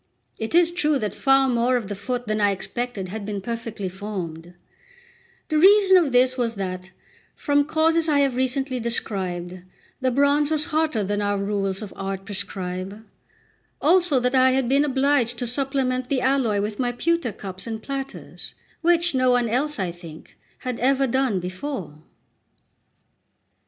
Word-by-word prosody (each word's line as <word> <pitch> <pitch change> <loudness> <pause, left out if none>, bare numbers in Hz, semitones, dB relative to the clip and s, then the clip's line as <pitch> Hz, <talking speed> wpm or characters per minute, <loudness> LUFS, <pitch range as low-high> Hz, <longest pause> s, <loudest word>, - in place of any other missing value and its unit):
It 220 +8 -3
is 345 -1 +5
true 305 -4 +1
that 210 -6 -3
far 270 0 +3
more 250 0 +2
of 225 -5 -5
the 205 - -4
foot 245 +5 -4
than 215 0 -1
I 205 - +4
expected 200 0 -4
had 215 +2 -5
been 205 0 -4
perfectly 230 -1 -5
formed; 180 -3 -6 0.9
the 310 -1 +2
reason 390 +2 +6
of 335 -7 +4
this 250 +1 +4
was 230 -2 0
that, 185 -1 -5 0.5
from 285 0 +1
causes 320 +1 +2
I 295 - +3
have 275 -2 +2
recently 260 0 0
described, 185 -6 -3 0.4
the 260 - +1
bronze 285 +3 +3
was 305 -1 +1
hotter 310 -9 +1
than 205 +1 -1
our 205 0 0
rules 195 0 -1
of 205 - -8
art 195 0 -5
prescribe; 190 +1 -5 0.7
also 340 -3 +3
that 250 +1 0
I 260 0 +5
had 265 -2 +1
been 275 +3 +3
obliged 265 -3 +1
to 245 - -2
supplement 255 0 -1
the 265 -3 +1
alloy 255 -6 +1
with 210 0 -4
my 245 -1 +1
pewter 335 +1 0
cups 195 0 -8
and 225 -1 -4
platters, 275 +3 -7 0.3
which 345 0 +3
no 255 -1 +2
one 245 -1 +3
else, 280 +7 -1
I 185 -4 -2
think, 170 -2 -13 0.3
had 250 -2 -4
ever 270 +2 +2
done 260 -5 +1
before. 185 - -6
245 Hz, 160 wpm, -23 LUFS, 200-275 Hz, 0.9 s, reason